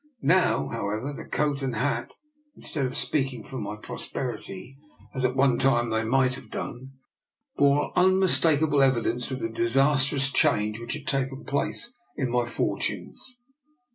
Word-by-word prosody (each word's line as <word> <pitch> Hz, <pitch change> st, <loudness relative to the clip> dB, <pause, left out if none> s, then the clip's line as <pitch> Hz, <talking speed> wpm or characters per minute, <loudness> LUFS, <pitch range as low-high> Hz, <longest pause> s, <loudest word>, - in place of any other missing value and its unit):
Now, 180 Hz, +4 st, +3 dB
however, 115 Hz, +5 st, -3 dB
the -, -, -8 dB
coat 145 Hz, -2 st, -1 dB
and 135 Hz, -2 st, -2 dB
hat, 145 Hz, -, -1 dB, 0.4 s
instead 140 Hz, -4 st, -3 dB
of 130 Hz, -, -5 dB
speaking 135 Hz, -4 st, -1 dB
for 130 Hz, -, -7 dB
my 105 Hz, -1 st, -4 dB
prosperity, 120 Hz, +1 st, -6 dB, 0.4 s
as 130 Hz, -, -3 dB
at 125 Hz, 0 st, +1 dB
one 135 Hz, -2 st, +3 dB
time 120 Hz, -3 st, +2 dB
they 110 Hz, 0 st, +1 dB
might 130 Hz, +2 st, +2 dB
have 135 Hz, -, -8 dB
done, 130 Hz, +2 st, -6 dB, 0.6 s
bore 140 Hz, 0 st, +3 dB
unmistakable 165 Hz, -5 st, +4 dB
evidence 125 Hz, -2 st, +1 dB
of 130 Hz, -, -3 dB
the -, -, 0 dB
disastrous 135 Hz, +4 st, +2 dB
change 105 Hz, -3 st, +2 dB
which 120 Hz, 0 st, -4 dB
had 150 Hz, -1 st, -7 dB
taken 135 Hz, -3 st, -2 dB
place 235 Hz, -, -2 dB, 0.2 s
in 130 Hz, -3 st, -1 dB
my 120 Hz, -1 st, +1 dB
for 120 Hz, -, -1 dB
tunes. 250 Hz, -, -4 dB
135 Hz, 150 wpm, -26 LUFS, 120-145 Hz, 0.6 s, unmistakable